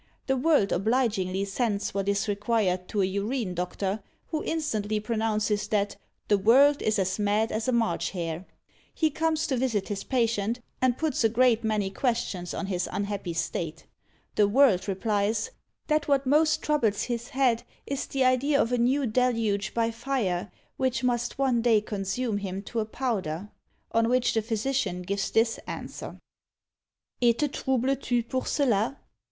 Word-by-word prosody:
The 265 Hz, -, +1 dB
World 265 Hz, -6 st, +3 dB
obligingly 200 Hz, -3 st, +1 dB
sends 205 Hz, 0 st, -1 dB
what 195 Hz, 0 st, -1 dB
is 200 Hz, +2 st, 0 dB
required 205 Hz, -3 st, 0 dB
to 205 Hz, -2 st, 0 dB
a -, -, +4 dB
Urine 200 Hz, +2 st, -2 dB
doctor, 190 Hz, +3 st, -2 dB, 0.3 s
who 310 Hz, -2 st, -2 dB
instantly 215 Hz, -10 st, -1 dB
pronounces 215 Hz, -1 st, 0 dB
that 205 Hz, -1 st, 0 dB, 0.3 s
"the 205 Hz, -1 st, +3 dB
World 275 Hz, +8 st, +5 dB
is 215 Hz, 0 st, +1 dB
as 190 Hz, +1 st, 0 dB
mad 210 Hz, +2 st, +1 dB
as 220 Hz, +2 st, -2 dB
a -, -, +3 dB
March 235 Hz, -2 st, +1 dB
hare!" 170 Hz, -2 st, -4 dB, 0.5 s
He 315 Hz, -2 st, +2 dB
comes 315 Hz, +1 st, 0 dB
to 275 Hz, -4 st, 0 dB
visit 230 Hz, -6 st, 0 dB
his 200 Hz, -2 st, -3 dB
patient, 230 Hz, -2 st, 0 dB, 0.2 s
and 255 Hz, -2 st, +2 dB
puts 310 Hz, -6 st, 0 dB
a 225 Hz, -, +5 dB
great 235 Hz, 0 st, +3 dB
many 210 Hz, -3 st, 0 dB
questions 195 Hz, -6 st, -1 dB
on -, -, -3 dB
his 185 Hz, -2 st, -2 dB
unhappy 200 Hz, -3 st, -3 dB
state. 165 Hz, -1 st, -3 dB, 0.5 s
The 210 Hz, -, +4 dB
World 205 Hz, -5 st, +4 dB
replies, 205 Hz, +2 st, 0 dB, 0.3 s
"that 305 Hz, -1 st, +1 dB
what 275 Hz, -1 st, +2 dB
most 305 Hz, +3 st, +3 dB
troubles 235 Hz, -9 st, +1 dB
his 240 Hz, -1 st, -3 dB
head 250 Hz, -4 st, +2 dB, 0.2 s
is 275 Hz, -1 st, -3 dB
the 270 Hz, -1 st, 0 dB
idea 260 Hz, +3 st, +3 dB
of 230 Hz, -, +2 dB
a 245 Hz, -, +1 dB
new 260 Hz, +4 st, +2 dB
deluge 225 Hz, -4 st, +1 dB
by 230 Hz, 0 st, +1 dB
fire, 225 Hz, -7 st, -2 dB, 0.3 s
which 255 Hz, -2 st, 0 dB
must 240 Hz, -1 st, 0 dB
one 260 Hz, -4 st, +2 dB
day 230 Hz, -2 st, +4 dB
consume 205 Hz, +2 st, -2 dB
him 195 Hz, 0 st, -5 dB
to 230 Hz, +3 st, -3 dB
a 215 Hz, -, 0 dB
powder;" 210 Hz, -6 st, -3 dB, 0.4 s
on 230 Hz, 0 st, +2 dB
which 250 Hz, 0 st, +2 dB
the 225 Hz, -, +2 dB
physician 220 Hz, -4 st, -1 dB
gives 200 Hz, +2 st, -2 dB
this 225 Hz, 0 st, +2 dB
answer: -, -, -7 dB, 1.0 s
Et 235 Hz, -1 st, +4 dB
te 295 Hz, -, +1 dB
troubles 265 Hz, -1 st, 0 dB
tu 245 Hz, -2 st, +1 dB
pour 255 Hz, +2 st, -3 dB
cela? 245 Hz, -2 st, +1 dB
225 Hz, 165 wpm, -27 LUFS, 200-255 Hz, 1.0 s, World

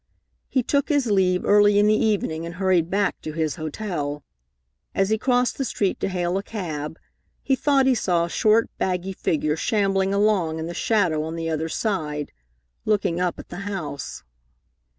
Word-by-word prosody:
He 260 Hz, -, +1 dB
took 280 Hz, +3 st, 0 dB
his 280 Hz, -7 st, +2 dB
leave 185 Hz, -2 st, +2 dB
early 205 Hz, 0 st, +5 dB
in 205 Hz, -, +5 dB
the 210 Hz, -, +5 dB
evening 200 Hz, -7 st, 0 dB
and 170 Hz, 0 st, -6 dB
hurried 180 Hz, -3 st, +2 dB
back 200 Hz, +1 st, 0 dB
to 155 Hz, -, -6 dB
his 155 Hz, -2 st, -1 dB
hotel. 155 Hz, -3 st, -4 dB, 0.7 s
As 195 Hz, +2 st, +1 dB
he 220 Hz, -, +3 dB
crossed 250 Hz, +1 st, +1 dB
the -, -, +1 dB
street 205 Hz, -6 st, -1 dB
to -, -, -1 dB
hail 180 Hz, 0 st, -1 dB
a -, -, -3 dB
cab, 160 Hz, -8 st, -5 dB, 0.5 s
he 270 Hz, -, +2 dB
thought 275 Hz, -1 st, +3 dB
he 265 Hz, -, +4 dB
saw 175 Hz, -7 st, +1 dB
a -, -, -7 dB
short, 220 Hz, +4 st, +3 dB
baggy 185 Hz, +1 st, -1 dB
figure 155 Hz, -4 st, 0 dB
shambling 195 Hz, +1 st, +1 dB
along 200 Hz, -6 st, +2 dB
in 160 Hz, -, -4 dB
the 170 Hz, -, -5 dB
shadow 175 Hz, -7 st, +1 dB
on 160 Hz, +1 st, -4 dB
the 165 Hz, -1 st, -3 dB
other 160 Hz, +1 st, -2 dB
side, 155 Hz, -8 st, -2 dB, 0.5 s
looking 200 Hz, -5 st, +1 dB
up 180 Hz, -1 st, 0 dB
at -, -, -11 dB
the 175 Hz, -, -7 dB
house. 155 Hz, -8 st, -5 dB
190 Hz, 180 wpm, -23 LUFS, 160-210 Hz, 0.7 s, early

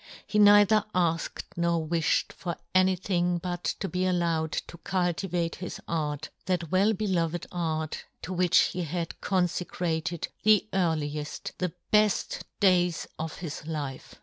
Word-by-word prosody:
He 210 Hz, -, 0 dB
neither 205 Hz, +1 st, +7 dB
afked 165 Hz, -2 st, 0 dB
nor 170 Hz, -1 st, +1 dB
wifhed 165 Hz, -1 st, +1 dB
for 175 Hz, -2 st, -4 dB, 0.2 s
any 185 Hz, 0 st, +4 dB
thing 180 Hz, -1 st, 0 dB
but 175 Hz, 0 st, -4 dB, 0.2 s
to 195 Hz, -, -2 dB
be 185 Hz, 0 st, 0 dB
allowed 170 Hz, -3 st, +1 dB
to 170 Hz, -, -5 dB
cultivate 175 Hz, -2 st, -1 dB
his 180 Hz, 0 st, -6 dB
art, 155 Hz, -2 st, -2 dB, 0.2 s
that 175 Hz, -4 st, -1 dB
well 200 Hz, +4 st, +4 dB
beloved 175 Hz, -5 st, -1 dB
art, 160 Hz, -3 st, -2 dB, 0.2 s
to 185 Hz, -, -4 dB
which 180 Hz, -1 st, +3 dB
he 180 Hz, -, -1 dB
had 170 Hz, 0 st, -4 dB
confecrated 175 Hz, -3 st, -1 dB
the 215 Hz, 0 st, +4 dB
earlieft, 155 Hz, -5 st, -1 dB
the 180 Hz, -2 st, 0 dB, 0.2 s
beft 210 Hz, -1 st, +3 dB, 0.2 s
days 180 Hz, -3 st, +3 dB
of 160 Hz, 0 st, -4 dB
his 160 Hz, -2 st, -6 dB
life. 145 Hz, -5 st, -5 dB
175 Hz, 140 wpm, -28 LUFS, 160-185 Hz, 0.2 s, neither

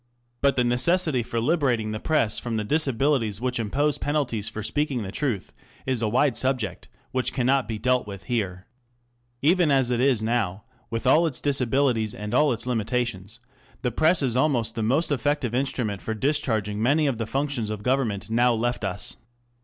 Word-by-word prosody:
But 140 Hz, 0 st, +3 dB
the 125 Hz, -, +2 dB
necessity 135 Hz, +4 st, +2 dB
for 115 Hz, 0 st, -3 dB
liberating 125 Hz, -5 st, +1 dB
the 110 Hz, -, -4 dB
Press 115 Hz, -8 st, +1 dB
from 115 Hz, -2 st, -3 dB
the 105 Hz, -, -1 dB
disabilities 135 Hz, -5 st, +1 dB
which 125 Hz, 0 st, -1 dB
impose 140 Hz, +7 st, 0 dB
penalties 125 Hz, -8 st, -1 dB
for 110 Hz, -1 st, -6 dB
speaking 140 Hz, -1 st, -1 dB
the. 95 Hz, -, -6 dB
^truth, 120 Hz, -8 st, -2 dB, 0.3 s
is 130 Hz, -3 st, 0 dB
a 110 Hz, -, +1 dB
wide 130 Hz, +2 st, +2 dB
subject, 130 Hz, -3 st, -1 dB, 0.2 s
which 130 Hz, -2 st, 0 dB
cannot 130 Hz, -1 st, +1 dB
be 110 Hz, -1 st, -3 dB
dealt 125 Hz, +1 st, +1 dB
with 100 Hz, -2 st, -8 dB
here. 95 Hz, -4 st, -3 dB, 0.8 s
Even 170 Hz, +1 st, +4 dB
as 135 Hz, -3 st, +3 dB
it 120 Hz, -, +1 dB, 0.2 s
now 110 Hz, -4 st, -1 dB
is, 125 Hz, -2 st, -36 dB
with 115 Hz, +2 st, -4 dB
all 155 Hz, +6 st, +5 dB
its 135 Hz, -6 st, -3 dB
disabilities 130 Hz, -5 st, +1 dB
and 105 Hz, +2 st, -6 dB
all 150 Hz, +2 st, +4 dB
its 120 Hz, -, -2 dB
limitations,, 115 Hz, -3 st, -2 dB, 0.4 s
the 125 Hz, -, 0 dB
Press 160 Hz, +6 st, +3 dB
is 125 Hz, -3 st, 0 dB
almost 125 Hz, -5 st, +1 dB
the 115 Hz, -, -3 dB
most 140 Hz, +9 st, +1 dB
effective 145 Hz, -2 st, 0 dB
instrument 125 Hz, -6 st, -1 dB
for 110 Hz, -, -3 dB
discharging 110 Hz, -6 st, 0 dB
many 145 Hz, +6 st, +3 dB
of 135 Hz, -5 st, -1 dB
the 115 Hz, -, -2 dB
functions 135 Hz, -4 st, -2 dB
of 105 Hz, -1 st, -5 dB
government 125 Hz, -6 st, 0 dB
now 120 Hz, +1 st, +3 dB
left 120 Hz, 0 st, -1 dB
us. 95 Hz, -1 st, -3 dB
125 Hz, 180 wpm, -25 LUFS, 110-140 Hz, 0.8 s, all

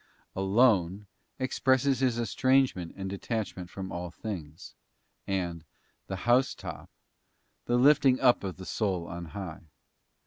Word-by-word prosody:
'* -, -, -40 dB
'Alone' 95 Hz, -1 st, +3 dB, 0.3 s
expresses 130 Hz, 0 st, +2 dB
his 125 Hz, -3 st, +1 dB
estrangement 130 Hz, -6 st, +2 dB
and 95 Hz, 0 st, -4 dB
detachment 100 Hz, -2 st, -4 dB
from 95 Hz, 0 st, -6 dB
all 85 Hz, 0 st, -4 dB
things; 85 Hz, -4 st, -7 dB, 0.5 s
and 90 Hz, -4 st, -2 dB, 0.4 s
the 95 Hz, -, -3 dB
'housetop' 125 Hz, +3 st, +1 dB, 0.8 s
the 120 Hz, -, +2 dB
lifting 135 Hz, 0 st, +5 dB
up 125 Hz, -5 st, +4 dB
of 95 Hz, -2 st, -4 dB
the 95 Hz, -, -9 dB
soul 95 Hz, -6 st, -1 dB
on 85 Hz, +1 st, -6 dB
high. 85 Hz, -2 st, -7 dB
100 Hz, 125 wpm, -29 LUFS, 90-125 Hz, 0.8 s, lifting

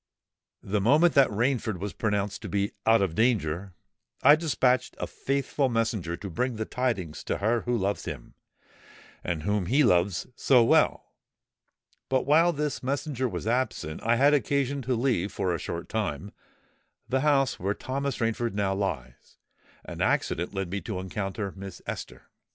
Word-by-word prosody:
The 100 Hz, +1 st, -1 dB
moment 150 Hz, -, +4 dB
that 135 Hz, -3 st, +5 dB
Rainford 110 Hz, -1 st, 0 dB
was 100 Hz, +3 st, -5 dB
pronounced 105 Hz, -2 st, -1 dB
to -, -, -6 dB
be 100 Hz, 0 st, 0 dB, 0.2 s
out 115 Hz, -2 st, +5 dB
of 90 Hz, -4 st, -1 dB
danger, 95 Hz, -5 st, 0 dB, 0.5 s
I 145 Hz, +3 st, +9 dB
despatched 130 Hz, -5 st, +1 dB
a -, -, -1 dB
faithful 140 Hz, 0 st, -1 dB
messenger 110 Hz, -7 st, -1 dB
to 100 Hz, -, -7 dB
break 125 Hz, +6 st, -1 dB
the 110 Hz, 0 st, -3 dB
tidings 105 Hz, -13 st, -2 dB
to -, -, -1 dB
her 110 Hz, +3 st, +1 dB
who 120 Hz, 0 st, 0 dB
loves 100 Hz, 0 st, -1 dB
him, -, -, -7 dB, 0.9 s
and 85 Hz, -3 st, -3 dB
whom 105 Hz, -1 st, 0 dB
he 140 Hz, +8 st, +4 dB
loves 90 Hz, -5 st, +2 dB
so 125 Hz, -1 st, +4 dB
well; 115 Hz, -, +2 dB, 1.0 s
but 130 Hz, -1 st, +1 dB
while 160 Hz, +5 st, +5 dB
this 150 Hz, -3 st, -2 dB
messenger 135 Hz, -1 st, -2 dB
was 90 Hz, -2 st, -5 dB
absent, 115 Hz, -10 st, -1 dB
I 115 Hz, +1 st, +2 dB
had 140 Hz, +4 st, +4 dB
occasion 140 Hz, +1 st, +1 dB
to 130 Hz, 0 st, -1 dB
leave, 115 Hz, -6 st, 0 dB
for 90 Hz, -2 st, -1 dB
a 85 Hz, -, -2 dB
short 85 Hz, 0 st, -5 dB
time, 100 Hz, -5 st, -3 dB, 0.8 s
the 130 Hz, -, +1 dB
house 140 Hz, -3 st, +2 dB
where 100 Hz, +3 st, -1 dB
Thomas 140 Hz, 0 st, -3 dB
Rainford 115 Hz, 0 st, -1 dB
now 100 Hz, -1 st, +1 dB
lies; 70 Hz, -12 st, -5 dB, 0.5 s
and -, -, -7 dB
accident 85 Hz, +2 st, 0 dB
led 95 Hz, -3 st, -4 dB
me 100 Hz, 0 st, -2 dB
to 110 Hz, -5 st, -5 dB
encounter 95 Hz, +1 st, -4 dB
Miss 95 Hz, -2 st, -8 dB
Esther. -, -, -6 dB
110 Hz, 160 wpm, -27 LUFS, 95-130 Hz, 1.0 s, I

